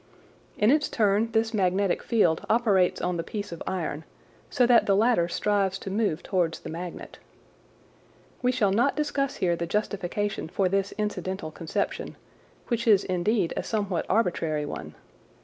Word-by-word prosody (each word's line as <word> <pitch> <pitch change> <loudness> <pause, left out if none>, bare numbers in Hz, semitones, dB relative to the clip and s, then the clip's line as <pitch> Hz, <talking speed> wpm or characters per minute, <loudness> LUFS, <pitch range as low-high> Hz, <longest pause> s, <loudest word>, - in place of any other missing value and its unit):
In 210 +4 +4
its 300 +1 +2
turn 215 +1 +2
this 225 +1 +1
magnetic 190 -1 +1
field 175 -9 +2
operates 210 -6 +3
on 180 0 -1
the 165 - -2
piece 205 +3 -5
of 170 - -8
iron, 160 -4 -3 0.5
so 250 - +3
that 240 -1 +5
the 200 - +4
latter 215 -4 +3
strives 195 +1 0
to 195 - -7
move 200 -6 0
towards 175 -4 0
the - - -7
magnet. 170 +1 -7 1.2
We 250 - +2
shall 220 -6 +1
not 240 +8 +2
discuss 285 -2 -1
here 175 -2 +1
the 170 0 -4
justification 200 0 -2
for 185 +3 0
this 195 +1 0
incidental 190 -5 -3
conception, 160 0 -3 0.5
which 235 -1 -1
is 205 -3 +6
indeed 185 +1 0
a - - -1
somewhat 200 -5 -2
arbitrary 165 -8 0
one. 75 - -7
195 Hz, 155 wpm, -26 LUFS, 175-220 Hz, 1.2 s, is